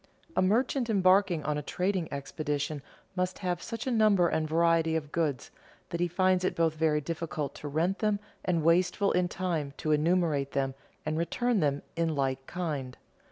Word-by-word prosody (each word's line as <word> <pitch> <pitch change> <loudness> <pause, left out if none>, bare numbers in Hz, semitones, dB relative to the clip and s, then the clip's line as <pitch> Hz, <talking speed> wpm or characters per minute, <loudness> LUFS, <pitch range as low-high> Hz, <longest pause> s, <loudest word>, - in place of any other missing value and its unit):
A - - +3
merchant 235 +5 +1
embarking 185 -4 +3
on 150 -1 -1
a - - -4
trading 180 +3 -1
expedition 145 +1 -3 0.3
must 185 0 -1
have 180 -2 -2
such 230 0 -5
a 260 - 0
number 210 -6 +4
and 155 -2 -1
variety 165 0 +3
of 150 -2 -3
goods, 150 -6 -1 0.4
that 170 - -3
he 175 - +2
finds 185 +1 +2
it 185 - 0
both 165 -1 +2
very 155 -1 +2
difficult 155 -2 -4
to 150 - -5
rent 165 +7 0
them 210 -2 +1 0.2
and 170 -3 0
wasteful 180 +4 +3
in 180 0 +2
time 165 -7 -3
to 155 - -1
enumerate 150 -3 +2
them 135 -1 0 0.3
and 155 +1 -1
return 240 +7 +1
them 145 -3 0
in 165 -2 0
like 135 -1 -1
kind. 150 -8 -4
165 Hz, 175 wpm, -29 LUFS, 150-185 Hz, 0.4 s, number